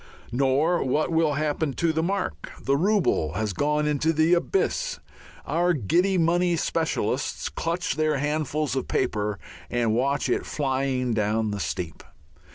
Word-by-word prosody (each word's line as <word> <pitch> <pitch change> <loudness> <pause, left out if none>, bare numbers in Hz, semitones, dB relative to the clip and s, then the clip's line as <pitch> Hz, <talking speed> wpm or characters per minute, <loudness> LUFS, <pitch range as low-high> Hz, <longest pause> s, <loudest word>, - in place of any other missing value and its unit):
Nor 140 +7 +2
what 150 +5 0
will 160 -2 +2
happen 150 0 -1
to 165 +2 +1
the 160 - +1
mark. 195 +4 -2
The 135 - +1
rouble 170 - +1
has 105 +1 -2
gone 150 +6 +1
into 150 +2 +1
the 160 +2 +3
Abyss. 445 - 0 0.5
Our 175 +2 +2
giddy 175 - +2
money 175 +1 +2
specialists 160 0 -1
clutch 165 - -2
their 155 -1 +2
handfuls 150 -1 -1
of 130 - -2
paper 105 -1 -1 0.3
and 120 -2 +1
watch 135 +5 +1
it 125 - 0
flying 130 -3 -1
down 110 0 0
the 105 - -3
steep. 80 0 -4
150 Hz, 145 wpm, -25 LUFS, 125-165 Hz, 0.5 s, the